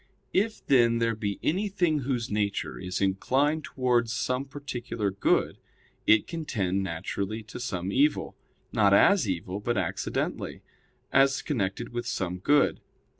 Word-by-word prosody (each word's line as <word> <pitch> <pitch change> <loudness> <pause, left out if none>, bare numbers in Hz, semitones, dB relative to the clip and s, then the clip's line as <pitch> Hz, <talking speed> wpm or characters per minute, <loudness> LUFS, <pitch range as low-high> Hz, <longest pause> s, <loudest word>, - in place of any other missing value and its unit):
If, 215 +3 0
then, 120 -3 +4
there 115 0 +1
be 105 -2 -3
anything 180 -3 +1
whose 125 -4 -2
nature 105 -1 -1
is 90 +1 -4
inclined 135 +11 +1
towards 120 -3 +1
some 125 +2 -1
particular 125 -7 -4
good, 100 - +1 0.5
it 110 -1 +5
can 165 -1 -5
tend 100 -9 -1
naturally 95 +4 -3
to 110 - -9
some 95 -7 -3
evil; 145 +6 +1 0.4
not 100 -2 +4
as 175 - +5
evil, 90 +2 -3
but 120 +3 -1
accidentally, - - -2 0.5
as 135 0 +4
connected 115 -4 -2
with 120 0 -4
some 90 -6 -2
good. 145 +9 +3
120 Hz, 135 wpm, -27 LUFS, 100-140 Hz, 0.5 s, it